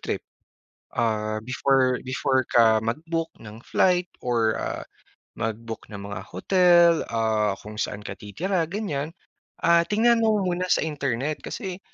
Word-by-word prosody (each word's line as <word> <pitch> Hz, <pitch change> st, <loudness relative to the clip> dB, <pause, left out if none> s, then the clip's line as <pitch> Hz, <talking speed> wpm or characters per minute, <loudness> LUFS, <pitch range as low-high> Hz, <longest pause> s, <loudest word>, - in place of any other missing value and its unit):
trip. -, -, -3 dB, 0.7 s
Ah, 110 Hz, -2 st, 0 dB
before 130 Hz, 0 st, +2 dB
before 130 Hz, 0 st, +1 dB
ka 110 Hz, -2 st, +5 dB
mag-book 165 Hz, +8 st, -2 dB
ng 110 Hz, +1 st, -11 dB
flight 180 Hz, -1 st, +2 dB, 0.2 s
or, 115 Hz, -3 st, +1 dB
ah, -, -, -3 dB, 0.6 s
mag-book 115 Hz, +1 st, -4 dB
ng 100 Hz, -2 st, -8 dB
mga 100 Hz, +1 st, -5 dB
hotel, 175 Hz, -2 st, +5 dB, 0.2 s
ah, 110 Hz, -3 st, +1 dB
kung 105 Hz, 0 st, -8 dB
saan 105 Hz, -1 st, -3 dB
ka -, -, -5 dB
titira, 165 Hz, -, -2 dB
ganiyan, 165 Hz, -6 st, -3 dB, 0.5 s
ah, 170 Hz, 0 st, +6 dB
tingnan 230 Hz, +2 st, +3 dB
mo 220 Hz, -1 st, +3 dB
muna 180 Hz, 0 st, -1 dB
sa -, -, +3 dB
internet 145 Hz, -2 st, -2 dB
kasi 190 Hz, -5 st, -5 dB
135 Hz, 135 wpm, -25 LUFS, 110-175 Hz, 0.7 s, ah